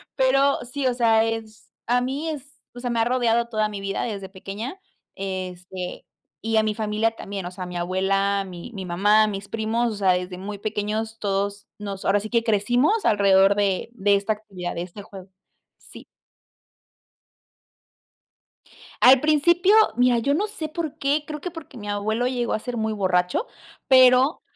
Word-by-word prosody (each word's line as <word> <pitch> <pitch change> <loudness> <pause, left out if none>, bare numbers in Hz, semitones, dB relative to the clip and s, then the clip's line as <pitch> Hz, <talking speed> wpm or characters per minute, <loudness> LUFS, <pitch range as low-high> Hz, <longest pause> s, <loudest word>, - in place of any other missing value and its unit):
Pero 275 +2 +3
sí, 260 +2 -2
o 250 - +1
sea, 225 -2 +4
es 225 -1 -5 0.2
a 245 +1 +2
mí 280 +6 -3
es 285 -2 -7 0.2
o 245 - -9
sea, 245 0 -3
me 235 -1 0
ha 225 - +3
rodeado 235 -2 +1
toda 215 -2 0
mi 205 -1 -6
vida 195 0 -3
desde 200 -4 -4
pequeña, 200 - -7 0.4
este, 185 -1 -6 0.4
y 225 +1 0
a 220 - +4
mi 215 -1 -1
familia 220 +1 0
también. 200 -4 -7
O 180 - -5
sea, 185 0 -7
mi 180 0 -6
abuela, 195 +3 0
mi 180 +5 -9
mi 195 -2 -6
mamá, 205 +5 +3
mis 200 -1 -5
primos, 225 +1 -1
o - - -6
sea, 195 -2 +2
desde 180 0 -2
muy 200 +2 -6
pequeños 215 +2 -3
todos 200 0 -2
nos 200 -2 -6
ahora 200 +1 +3
sí 215 +1 -7
que 235 -1 +1
crecimos 245 - +2
alrededor 200 -2 +4
de 200 +1 0
de 200 -2 +2
esta 200 +2 0
actividad, 190 -4 -7
de 170 - -3
este 185 +3 -8
juego, 190 -1 -12 0.5
sí. - - -13 3.0
Al 255 +1 +8
principio, 345 +6 +4 0.2
mira 245 -1 +3
yo 280 +5 +1
no 410 +6 0
sé 320 -7 -4
por 315 -1 -5
qué, 290 +2 0
creo 300 -1 -6
que 360 - -5
porque 325 -6 -11
mi 205 -1 -8
abuelo 215 +4 -1
llegó 245 -2 -1
a - - +1
ser 245 +2 -6
muy 220 0 -1
borracho, 185 - 0 0.4
pero, 255 +3 +5
215 Hz, 175 wpm, -23 LUFS, 195-250 Hz, 3.0 s, Al